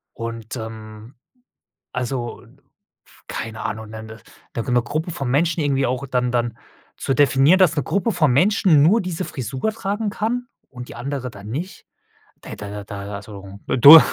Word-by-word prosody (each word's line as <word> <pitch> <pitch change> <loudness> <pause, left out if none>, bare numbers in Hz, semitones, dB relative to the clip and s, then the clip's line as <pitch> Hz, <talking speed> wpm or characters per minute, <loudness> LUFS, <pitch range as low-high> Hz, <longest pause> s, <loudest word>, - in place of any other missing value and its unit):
Und, 115 0 -6
ähm, 110 0 -8 0.8
also, 125 -1 -3
n - - -21 0.4
f - - -23
keine 110 -1 -5
Ahnung 110 0 -4
'ne 110 0 -8
'ne 110 0 -10 0.4
d 115 - 0
'ne 120 0 +4
Gruppe 160 +6 -3
von 135 -6 -3
Menschen 160 +5 +2
irgendwie 140 -2 +2
auch, 130 +2 -1
dann 125 -1 0
dann 120 -2 -1 0.4
zu 135 - -1
definieren, 145 +6 +5
dass 175 -4 +5
'ne 145 - 0
Gruppe 200 - 0
von 155 -9 +3
Menschen 175 - +4
nur 200 +8 +5
diese 180 0 -3
Frisur 130 - -3
tragen 210 0 -2
kann 235 +3 -2 0.2
und 125 -1 -9
die - - -9
andere 130 +1 -4
dann 105 -2 -11
nicht. 170 +10 -5 0.6
Ey, - - -7
da 100 - -7
da 105 0 -6
da 100 0 -6
also 100 -1 -9
du 145 +6 +11
130 Hz, 175 wpm, -22 LUFS, 110-165 Hz, 0.8 s, du